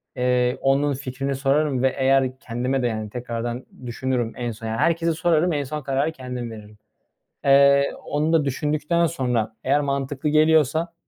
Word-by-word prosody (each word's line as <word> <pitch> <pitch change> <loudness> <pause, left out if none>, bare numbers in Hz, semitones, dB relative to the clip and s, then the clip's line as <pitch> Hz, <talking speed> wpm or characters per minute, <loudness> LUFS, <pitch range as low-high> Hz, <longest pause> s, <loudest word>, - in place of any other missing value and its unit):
Eee, 125 0 +1
onun 140 +2 +2
fikrini 135 +1 -4
sorarım 135 -1 +1
ve 130 - +2
eğer 130 -1 +2
kendime 125 +3 -2
de, 120 - +1
yani, 110 -2 -4
tekrardan 120 +1 -5 0.2
düşünürüm, 120 -1 -2
en 120 -1 -3
son, 115 +1 -8
yani, 110 0 -2
herkese 165 +4 +1
sorarım, 165 +1 +1
en 145 -1 -1
son 150 +3 -5
kararı 140 +3 0
kendim 125 -4 -6
veririm. 105 -1 -12 0.7
Eee, 140 0 +5
onu 150 +2 0
da 160 -3 +3
düşündükten 150 +5 0
sonra 125 -9 -1
eğer 145 +2 +2
mantıklı 140 +1 -2
geliyorsa 155 +1 +3
135 Hz, 155 wpm, -23 LUFS, 125-150 Hz, 0.7 s, Eee